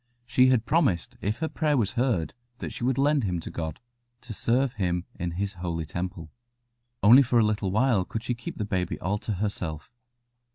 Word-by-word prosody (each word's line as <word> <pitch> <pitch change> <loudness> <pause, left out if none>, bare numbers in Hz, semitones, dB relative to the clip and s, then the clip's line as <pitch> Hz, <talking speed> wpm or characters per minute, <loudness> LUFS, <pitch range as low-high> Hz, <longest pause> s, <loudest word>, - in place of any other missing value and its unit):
She 125 +1 +4
had 125 -3 +3
promised, 135 - +1
if 105 +2 -1
her 160 - +1
prayer 155 -2 +1
was 110 -6 +1
heard, 120 -10 0 0.2
that - - -6
she - - -6
would 130 0 +1
lend 145 0 +3
him 90 -4 -1
to - - -7
God, 80 -1 -4 0.4
to 120 -3 -8
serve 125 +4 +1
Him 90 -4 -1
in 85 -1 -4
His 100 +3 -2
Holy 85 -3 -3
Temple. 85 0 -5 0.7
Only 120 +6 +9
for 125 -2 +2
a 115 - +5
little 105 -2 0
while 110 0 +2
could 110 +4 -5
she 125 - -1
keep 120 -1 -7
the 105 - -2
baby 95 -3 -2
all 105 +3 -1
to 110 - -3
herself. 95 -3 -4
105 Hz, 200 wpm, -27 LUFS, 90-125 Hz, 0.7 s, Only